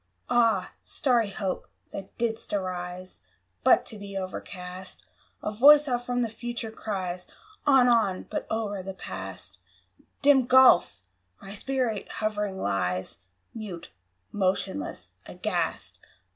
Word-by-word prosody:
Ah, 225 -6 +3
starry 240 -6 +2
Hope! 195 -2 -3 0.2
that 195 -1 -8
didst 230 -2 -2
arise 185 - -4 0.4
But - - +5
to 215 - -6
be 200 -1 -6
overcast! 185 -1 -6 0.4
A 210 - -1
voice 290 +7 +8
from 265 - -1
out 245 0 -1
the - - 0
Future 235 -1 -4
cries, 185 -5 -4 0.4
"On! 265 -3 +6
on!" 225 -6 +3
but - - -5
o'er 210 -3 -2
the 190 +1 -7
Past 95 - -7 0.6
(Dim 270 -3 +6
gulf!) 255 - +6 0.4
my 195 - -9
spirit 240 -3 -2
hovering 210 -2 -2
lies 95 - -1 0.3
Mute, 205 -7 -7 0.4
motionless, 195 +6 -2
aghast! - - -2
205 Hz, 115 wpm, -27 LUFS, 185-240 Hz, 0.6 s, voice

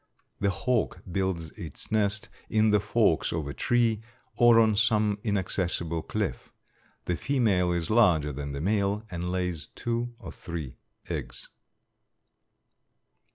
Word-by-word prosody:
The 100 - +2
hawk 100 -1 -1
builds 90 -3 -1
its - - -8
nest 105 -1 +1 0.2
in 110 0 +3
the 105 - +5
forks 105 -4 +2
of 80 -3 -2
a 70 - -4
tree 115 - +2 0.3
or 120 -1 +6
on 110 -2 +4
some 105 -1 +2
inaccessible 90 -5 -1
cliff. - - -3 0.5
The 90 - 0
female 100 -8 +2
is 85 0 -1
larger 85 -10 +4
than 70 +1 -5
the 70 - -4
male 100 +2 +1
and 90 0 -3
lays 90 -4 -2
two 120 0 -2
or - - -9
three 80 -7 -7 0.3
eggs. - - -6
100 Hz, 130 wpm, -28 LUFS, 85-110 Hz, 0.5 s, or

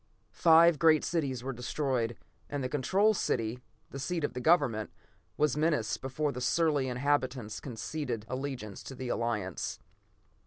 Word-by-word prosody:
Five 165 -1 +6
great 160 -2 +5
cities 135 -8 -1
were 135 +1 -3
destroyed, 125 -2 -1 0.3
and 145 -2 -3
the - - 0
Control 190 +10 +3
City, 115 - -1 0.3
the 135 - -6
seat 165 +4 -2
of - - -1
the 125 - -4
government, 130 -9 +3 0.5
was 150 -2 +2
menaced 150 -7 0
before 140 +3 -1
the 125 - -6
surly 150 0 +2
inhabitants 130 -4 -1
conceded 120 -1 -4
allegiance 130 -6 -5
to 135 - -9
the 130 0 -5
Alliance. 105 -7 -2
135 Hz, 145 wpm, -30 LUFS, 120-150 Hz, 0.5 s, Five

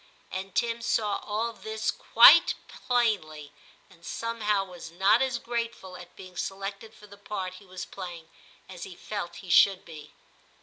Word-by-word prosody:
And 190 0 -6
Tim 235 0 0
saw 210 -2 0
all 225 +2 -3
this 220 0 -3
quite - - +7
plainly, 190 - -1 0.4
and 170 - -22
somehow 210 -2 -1
was 180 -3 -10
not 195 +7 +3
as 260 -2 0
grate 235 -1 -3
ful 185 -1 -12
at 180 -1 -12
being 185 -1 -12
selected 195 +4 -5
for 210 - -15
the 200 0 -15
part 190 -3 -5
he - - -17
was 185 0 -7
playing 175 -4 -8 0.4
as 185 -2 -11
he 185 - -8
felt 200 -4 -6
he - - -11
should 195 +1 +5
be. 155 -3 -11
195 Hz, 165 wpm, -27 LUFS, 180-220 Hz, 0.4 s, quite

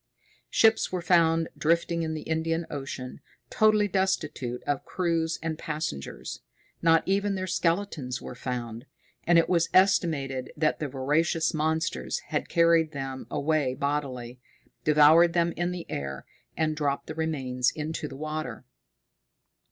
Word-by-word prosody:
Ships 225 0 +3
were 180 -2 -3
found 165 -2 +3
drifting 170 +1 +1
in 160 -1 -2
the 155 - -5
Indian 165 +1 -1
Ocean, 135 -3 -6 0.3
totally 215 -1 +4
destitute 165 -10 -1
of 145 -1 -1
crews 165 -2 -1
and 160 -1 -3
passengers; 150 - -5 0.4
not 165 -1 +4
even 200 +1 +1
their 185 0 -2
skeletons 170 -7 -1
were - - -8
found, 120 0 -5 0.4
and 170 0 +5
it 165 - +4
was 170 -2 +2
estimated 155 -9 +2
that 155 0 +1
the 150 - -2
voracious 155 +5 +1
monsters 160 - -1
had - - -2
carried 165 -2 +3
them 135 -1 -5
away 145 -3 0
bodily, 130 -4 -3 0.4
devoured 155 +3 +6
them 170 -1 +2
in 175 +1 -2
the 180 -2 -5
air, 70 -1 -5 0.3
and 155 -1 +1
dropped 140 -2 -1
the - - -6
remains 135 -6 0
into 155 +1 -4
the 135 - -9
water. 155 -6 -5
160 Hz, 135 wpm, -27 LUFS, 140-170 Hz, 0.4 s, devoured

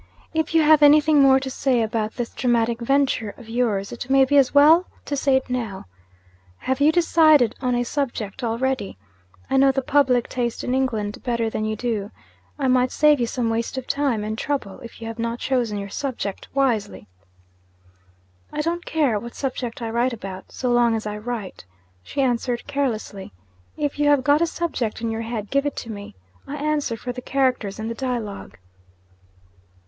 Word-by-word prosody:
'If 320 0 -1
you 325 - +5
have 305 0 +6
anything 300 +1 +6
more 265 -1 +6
to 265 0 -5
say 255 -3 +1
about 220 0 -2
this 240 -2 -4
dramatic 235 -2 +1
venture 260 -4 0
of 240 - -13
yours, 225 -4 -1
it 240 +1 -7
may 270 0 +5
be 285 - 0
as 275 -3 +5
well 310 +5 +6 0.2
to 290 - -2
say 275 -1 +2
it 265 - 0
now. 230 -6 -4 0.7
Have 260 - -2
you 300 +2 +6
decided 310 -7 +4
on 250 -2 +1
a 245 - +1
subject 240 -3 -3
already? 235 - -1 0.5
I - - +1
know 270 0 +5
the 270 0 -2
public 260 -4 +2
taste 240 -2 -3
in 250 - -1
England 225 -6 -1
better 235 -3 -1
than 215 - -2
you 215 0 -1
do 215 -3 -2 0.5
I 275 -2 0
might 255 0 +3
save 300 -2 +4
you 240 - 0
some 235 -1 -1
waste 230 +3 -2
of 260 - -4
time 275 -7 0
and 215 +1 -3
trouble, 270 -9 -3
if 230 - -12
you 225 - -5
have 225 +1 -7
not 230 0 -2
chosen 240 -5 -1
your 200 0 -5
subject 230 -8 -4
wisely.' 225 - -1 1.4
'I 300 - -2
don't 340 +2 -2
care 280 -10 +1
what 235 +2 -9
subject 250 -3 -4
I 225 - -3
write 240 +2 +1
about, 195 -4 -8
so 250 -1 -2
long 240 -1 +3
as 220 - -4
I 210 0 -3
write,' 215 - -6 0.4
she 275 - -2
answered 245 -1 -1
carelessly. 230 - -3 0.4
'If 290 -1 -2
you 295 - +3
have 285 -3 +4
got 290 +3 +3
a 335 - +3
subject 320 -10 -3
in 230 -1 -1
your 225 0 -3
head, 225 -2 -5
give 275 +1 +2
it 290 - -4
to 230 - -6
me. 200 - -9 0.3
I 285 - -5
answer 295 -5 -1
for 245 - -5
the 250 +1 -7
characters 255 -7 0
and 220 0 -4
the 230 - -3
dialogue.' 235 -5 -5
250 Hz, 190 wpm, -23 LUFS, 225-275 Hz, 1.4 s, have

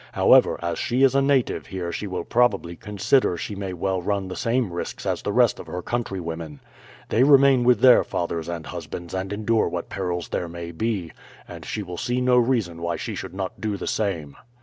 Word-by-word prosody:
However, - - +5
as 85 0 -2
she 125 +3 +1
is 135 -1 +5
a 140 - +3
native 135 -2 +1
here 90 -3 -4
she 105 - -4
will 90 -2 -3
probably 100 -8 +1
consider 105 +1 +1
she 105 - -5
may 100 -1 -4
well 95 +1 -2
run 100 0 -2
the 90 - -5
same 115 -5 0
risks 85 - -5
as - - -1
the - - -2
rest - - +3
of - - -9
her 90 0 -5
countrywomen. 85 - -4 0.5
They 115 - +2
remain 135 -2 +6
with 120 -3 +4
their 125 -2 +7
fathers 85 -1 -3
and 85 -2 -5
husbands 85 0 -7
and 95 +1 -3
endure 110 +2 +1
what - - -5
perils 90 -2 -3
there 85 - -3
may 85 0 -7
be, 95 -2 -2 0.4
and - - -9
she 105 - -4
will 90 -2 -7
see 120 +6 -1
no 125 0 +3
reason 115 -9 +1
why 85 0 -1
she - - -5
should 90 - -7
not 95 -1 -5
do 105 -2 -2
the - - -6
same." 85 -9 -2
95 Hz, 210 wpm, -24 LUFS, 85-120 Hz, 0.5 s, their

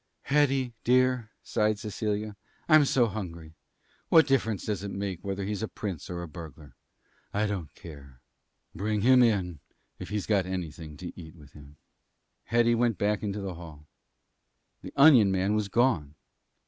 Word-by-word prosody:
"Hetty, 135 -3 +1
dear," 125 -2 +2
sighed 105 0 0
Cecilia, 105 0 -3 0.3
"I'm 155 -2 +6
so 130 -3 +3
hungry. 85 -7 -6 0.6
What 160 -1 +7
difference 115 -8 0
does 105 -4 -2
it 100 - -5
make 95 -3 -4
whether 100 0 -3
he's 105 0 -3
a 110 - -2
prince 95 -5 -6
or 85 -1 -4
a - - -6
burglar? 75 -2 -11 0.6
I 105 +1 +2
don't 95 -7 -4
care. 70 -5 -12 0.5
Bring 105 +3 -1
him 125 +3 +6
in 95 - +1 0.4
if - - -7
he's 105 -2 -2
got 100 -4 +1
anything 80 -4 -6
to 90 - -7
eat 80 -1 -11
with 75 -4 -16
him." 75 0 -15 0.7
Hetty 120 +1 +3
went 115 -3 +1
back 105 +1 0
into 105 -1 -3
the 95 -2 -4
hall. 80 -3 -11 1.0
The - - -9
onion 135 -8 +7
man 95 +2 +1
was 105 -1 0
gone. 100 - +1
100 Hz, 160 wpm, -28 LUFS, 85-115 Hz, 1.0 s, What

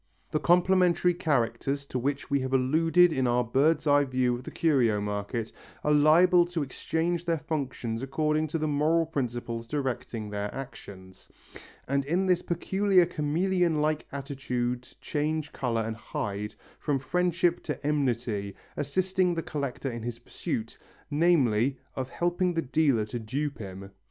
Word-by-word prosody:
The 155 - +1
complementary 180 0 +4
characters 140 -3 0
to 130 - -3
which 140 +2 -2
we 140 - +3
have 130 0 -3
alluded 165 +6 +4
in 130 -3 +1
our 120 +1 +2
bird's 145 +7 +2
eye 145 -1 +5
view 130 -2 +1
of 120 +1 -5
the - - -7
curio 125 -10 +2
market 105 +3 -3 0.3
are 150 - +2
liable 165 +4 +6
to 175 -3 -2
exchange 165 +5 -2
their 165 -1 +1
functions 130 -7 -3
according 155 +3 0
to 155 - -2
the 155 -1 -1
moral 155 +3 +2
principles 120 -6 -3
directing 125 -5 -3
their 105 0 -3
actions, 95 -8 -10 0.6
and 140 +1 +1
in 175 +6 +1
this 180 -2 +3
peculiar 190 +2 +2
chameleon 170 +1 +1
like 155 0 0
attitude 125 -3 -3
change 155 0 -2
colour 115 -3 -1
and 110 0 -4
hide, 105 -1 -4 0.2
from 145 -3 0
friendship 175 +4 +1
to - - -4
enmity, 120 -9 -1 0.2
assisting 185 +4 +1
the 165 - -2
collector 140 -2 -3
in 115 -1 -6
his 120 0 -4
pursuit, 115 -1 -5 0.3
namely, 140 -6 +3 0.2
of 130 -1 -3
helping 175 +2 0
the 165 - 0
dealer 135 -5 +2
to 115 +3 -5
dupe 140 +6 -3
him. 95 -1 -8
140 Hz, 150 wpm, -28 LUFS, 120-165 Hz, 0.6 s, liable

